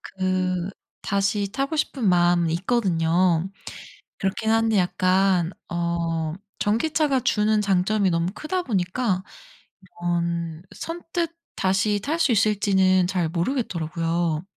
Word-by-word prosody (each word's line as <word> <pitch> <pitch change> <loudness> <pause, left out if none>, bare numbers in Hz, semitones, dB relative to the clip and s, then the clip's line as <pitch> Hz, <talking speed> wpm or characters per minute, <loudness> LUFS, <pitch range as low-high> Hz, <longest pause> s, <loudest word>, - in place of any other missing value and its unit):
그 185 -1 -1 0.3
다시 200 0 0
타고 275 +3 -1
싶은 265 -8 0
마음이 175 -2 +3
있거든요. 180 -3 +1 0.7
그렇기는 220 +3 0
한데 225 -1 +2
약간 185 -1 +2 0.2
어 170 -2 -1 0.3
전기차가 275 +5 +1
주는 210 0 +2
장점이 195 0 +2
너무 170 +2 0
크다 360 - -3
보니까 190 - -1 0.8
이런 170 -1 -2
선뜻 335 0 -4 0.2
다시 195 +2 +1
탈 310 +9 -1
수 280 - +3
있을지는 195 -4 +3
잘 180 -3 0
모르겠더라고요. 170 - -1
190 Hz, 245 characters per minute, -24 LUFS, 175-215 Hz, 0.8 s, 마음이